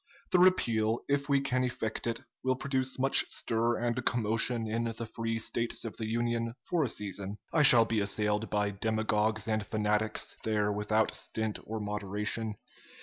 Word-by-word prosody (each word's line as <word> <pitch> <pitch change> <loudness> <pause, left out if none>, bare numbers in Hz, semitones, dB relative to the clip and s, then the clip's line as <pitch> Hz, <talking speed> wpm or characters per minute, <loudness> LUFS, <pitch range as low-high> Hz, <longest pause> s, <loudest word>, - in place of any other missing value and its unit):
The 185 - +5
repeal, 115 -11 +3
if 140 0 0
we 140 -1 +4
can 130 -2 0
effect 115 -2 -3
it, 115 -1 -2 0.2
will 130 0 +2
produce 130 0 -1
much 135 +1 +4
stir 115 +1 0
and 120 +1 -1
commotion 115 0 +1
in 115 +2 -1
the 115 0 -4
free 115 0 -3
States 115 +1 -2
of 115 - -6
the 110 - -3
Union 115 0 -1
for 175 -3 0
a - - 0
season. 100 -2 -3 0.2
I 160 - +4
shall 120 -5 +8
be 115 -1 0
assailed 105 +2 0
by 105 -1 0
demagogues 110 +1 0
and 110 -1 0
fanatics 105 +1 -1
there 105 -1 +1
without 105 +1 +1
stint 110 -1 -3
or 110 0 -4
moderation. 105 +1 -3
110 Hz, 165 wpm, -30 LUFS, 105-120 Hz, 0.2 s, shall